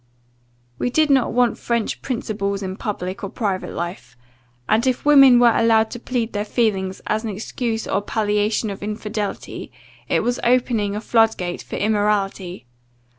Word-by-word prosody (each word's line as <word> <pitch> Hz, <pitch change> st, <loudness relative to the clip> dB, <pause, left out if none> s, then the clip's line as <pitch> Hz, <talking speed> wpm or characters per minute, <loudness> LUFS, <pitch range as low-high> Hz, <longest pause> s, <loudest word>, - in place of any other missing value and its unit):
We -, -, 0 dB
did 305 Hz, +3 st, +2 dB
not 265 Hz, -3 st, +3 dB
want 245 Hz, 0 st, +2 dB
French 235 Hz, -2 st, -2 dB
principles 205 Hz, -5 st, -3 dB
in 190 Hz, 0 st, -4 dB
public 190 Hz, -2 st, -5 dB
or 200 Hz, -, -3 dB
private 195 Hz, -3 st, -2 dB
life 170 Hz, -8 st, -6 dB, 0.5 s
and, 225 Hz, +4 st, +2 dB
if 255 Hz, +1 st, 0 dB
women 275 Hz, -4 st, +8 dB
were 240 Hz, -2 st, +5 dB
allowed 225 Hz, -1 st, +3 dB
to 240 Hz, -, -6 dB
plead 240 Hz, -2 st, -2 dB
their 205 Hz, 0 st, -1 dB
feelings, 195 Hz, -4 st, -1 dB
as 215 Hz, +1 st, -1 dB
an 225 Hz, -, -3 dB
excuse 225 Hz, +2 st, -3 dB
or 200 Hz, -, 0 dB
palliation 210 Hz, +1 st, 0 dB
of 195 Hz, -, -8 dB
infidelity, 210 Hz, 0 st, -5 dB, 0.4 s
it -, -, +2 dB
was 245 Hz, 0 st, 0 dB
opening 235 Hz, -4 st, +1 dB
a 210 Hz, -, -3 dB
flood 225 Hz, -1 st, +3 dB
gate 175 Hz, -1 st, -4 dB
for -, -, -8 dB
immorality. 200 Hz, -, -1 dB
215 Hz, 160 wpm, -21 LUFS, 200-235 Hz, 0.5 s, women